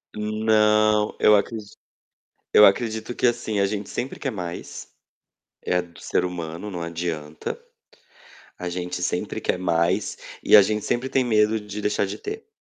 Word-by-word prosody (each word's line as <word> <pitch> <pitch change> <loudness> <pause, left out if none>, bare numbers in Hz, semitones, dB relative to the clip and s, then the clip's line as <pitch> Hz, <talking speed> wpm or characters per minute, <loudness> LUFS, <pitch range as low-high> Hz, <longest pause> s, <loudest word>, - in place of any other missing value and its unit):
Não. 105 0 +2
Eu 105 - +6
acredi 105 +1 -1 0.9
eu 105 - +9
acredito 110 +3 +2
que - - +1
assim: 120 -3 0
a 100 - +3
gente 100 0 -4
sempre 130 - -4
quer 135 - -2
mais. 90 -4 -7 0.7
É 90 0 +1
do 85 -2 -15
ser - - 0
humano, 90 +2 -5
não 90 - -5
adianta. 85 -2 -4 1.0
A 90 - -4
gente 90 0 -4
sempre 90 - -2
quer - - 0
mais 90 +2 0 0.2
e - - +7
a 105 - +9
gente 105 +1 -1
sempre 130 +2 -1
tem 130 -1 +1
medo 110 -1 +2
de 105 0 -7
deixar 105 0 0
de 95 - -6
ter. 430 +2 -7
105 Hz, 155 wpm, -24 LUFS, 90-110 Hz, 1.0 s, eu